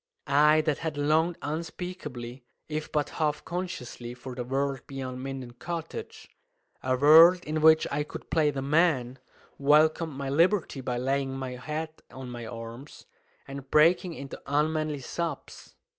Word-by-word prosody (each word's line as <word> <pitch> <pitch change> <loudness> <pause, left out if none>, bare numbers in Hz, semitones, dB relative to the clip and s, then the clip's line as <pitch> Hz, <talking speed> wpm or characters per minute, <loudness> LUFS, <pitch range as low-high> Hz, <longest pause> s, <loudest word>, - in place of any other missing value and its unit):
I 150 +2 +5
that 150 -3 -1
had 160 -2 -4
longed 160 +4 +2
unspeakably, 150 -6 -6 0.2
if 155 0 -4
but 145 -1 0
half 150 -1 0
consciously, 125 -9 -5
for 125 +1 -8
the 125 0 -4
world 135 +1 -1
beyond 130 -2 -6
Minden 135 -2 -6
Cottage 165 +6 -7 0.5
a 130 0 0
world 165 +6 +8
in 155 +1 -2
which 160 0 +6
I 145 +1 0
could 150 - -8
play 155 -3 +3
the 135 -2 -3
man 140 -4 +2 0.4
welcomed 155 +3 +3
my 140 0 -5
liberty 165 -2 +2
by 125 -1 -2
laying 135 +1 -1
my 130 -1 -4
head 155 +5 -5
on 130 -1 -8
my 120 -2 -7
arms 115 +4 -9 0.4
and 135 -1 -8
breaking 165 +3 +4
into 140 -2 -8
unmanly 150 0 0
sobs. 170 +6 -5
145 Hz, 145 wpm, -28 LUFS, 130-160 Hz, 0.5 s, world